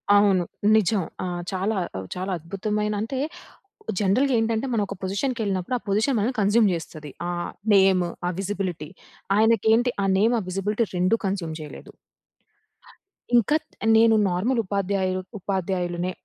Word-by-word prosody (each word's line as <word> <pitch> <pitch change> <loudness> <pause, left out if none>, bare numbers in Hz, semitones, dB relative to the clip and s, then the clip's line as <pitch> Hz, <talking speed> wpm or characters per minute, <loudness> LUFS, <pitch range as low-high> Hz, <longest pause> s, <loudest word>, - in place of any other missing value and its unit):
అవును. 195 -3 +4 0.3
నిజం. 210 -1 +2 0.2
ఆ! - - -2 0.3
చాలా 195 +3 -1 0.4
చాలా 185 +1 -3
అద్భుతమైన 210 +5 -2
అంటే, 230 +4 -3 0.8
జనరల్‌గా 245 +7 +2
ఏంటంటే 225 +2 0
మనం 215 -3 +1
ఒక 200 - -6
పొజిషన్‌కెళ్ళినప్పుడు. 200 0 -1
ఆ - - -11
పొజిషన్ 220 +6 +2
మనల్ని 240 +5 0
కన్స్యూమ్ 205 +1 +4
జేస్తది. 155 -3 -7 0.2
ఆహ్, 175 0 -3 0.2
నేమ్ 190 -2 +5 0.2
ఆ - - +1
విజిబిలిటీ. 185 -6 -3 0.5
ఆయనకి 225 -1 +3
ఏంటి 245 +2 +3
ఆ - - +1
నేమ్, 225 +4 +3
ఆ - - -3
విజిబిలిటీ 205 +5 0
2 185 +6 +3
కన్స్యూమ్ 185 -5 -2
చేయలేదు. 150 - -10 1.5
ఇంకా 240 +7 +3 0.4
నేను 225 0 +5
నార్మల్ 220 +8 0
ఉపాధ్యాయు 190 -1 -1 0.2
ఉపాధ్యాయులనే 180 -2 -2
200 Hz, 130 wpm, -24 LUFS, 185-220 Hz, 1.5 s, నేమ్